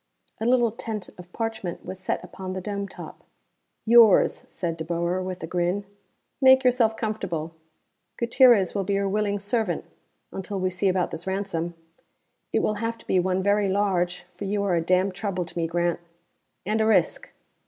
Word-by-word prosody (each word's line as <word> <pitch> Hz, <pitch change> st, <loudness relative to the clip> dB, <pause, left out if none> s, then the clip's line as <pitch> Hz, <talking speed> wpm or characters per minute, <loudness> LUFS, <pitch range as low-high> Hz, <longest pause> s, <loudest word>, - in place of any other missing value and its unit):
A 225 Hz, -, -1 dB
little 240 Hz, -2 st, +3 dB
tent 215 Hz, -3 st, -6 dB
of 180 Hz, 0 st, -12 dB
parchment 220 Hz, -6 st, -4 dB
was 185 Hz, -, -7 dB
set 190 Hz, -, -2 dB
upon 185 Hz, -1 st, -7 dB
the 190 Hz, -, -3 dB
dome 200 Hz, +1 st, -4 dB
top. -, -, -11 dB, 0.6 s
"Yours," 230 Hz, -3 st, +6 dB
said 170 Hz, -3 st, -4 dB
De 160 Hz, -, -5 dB
Boer, 170 Hz, +2 st, -1 dB
with 185 Hz, -2 st, -5 dB
a -, -, -1 dB
grin. 180 Hz, +4 st, -1 dB, 0.6 s
"Make 265 Hz, 0 st, +7 dB
yourself 240 Hz, -3 st, +3 dB
comfortable. 175 Hz, -8 st, -3 dB, 0.6 s
Gutierrez 235 Hz, -5 st, +5 dB
will 200 Hz, -, -1 dB
be 200 Hz, +2 st, -1 dB
your 200 Hz, 0 st, 0 dB
willing 205 Hz, 0 st, 0 dB
servant, 205 Hz, -3 st, -1 dB, 0.5 s
until 195 Hz, +1 st, -4 dB
we 185 Hz, 0 st, 0 dB
see 185 Hz, +2 st, 0 dB
about 185 Hz, -1 st, 0 dB
this 165 Hz, +3 st, -7 dB
ransom. 190 Hz, -3 st, -2 dB, 0.8 s
It -, -, +1 dB
will 215 Hz, -, 0 dB
have 230 Hz, 0 st, -2 dB
to -, -, -18 dB
be 185 Hz, -, +2 dB
one 185 Hz, +1 st, 0 dB
very 200 Hz, 0 st, +2 dB
large, 180 Hz, -3 st, 0 dB
for 200 Hz, -, -6 dB
you 200 Hz, +1 st, -1 dB
are 195 Hz, -3 st, +1 dB
a 170 Hz, -, +2 dB
damn 185 Hz, +3 st, +2 dB
trouble 185 Hz, -2 st, -3 dB
to 165 Hz, -, -12 dB
me, 165 Hz, -1 st, 0 dB
Grant. 175 Hz, +1 st, 0 dB, 0.7 s
And 215 Hz, +3 st, +1 dB
a 220 Hz, -, +2 dB
risk. 220 Hz, -, +2 dB
195 Hz, 180 wpm, -25 LUFS, 180-215 Hz, 0.8 s, Make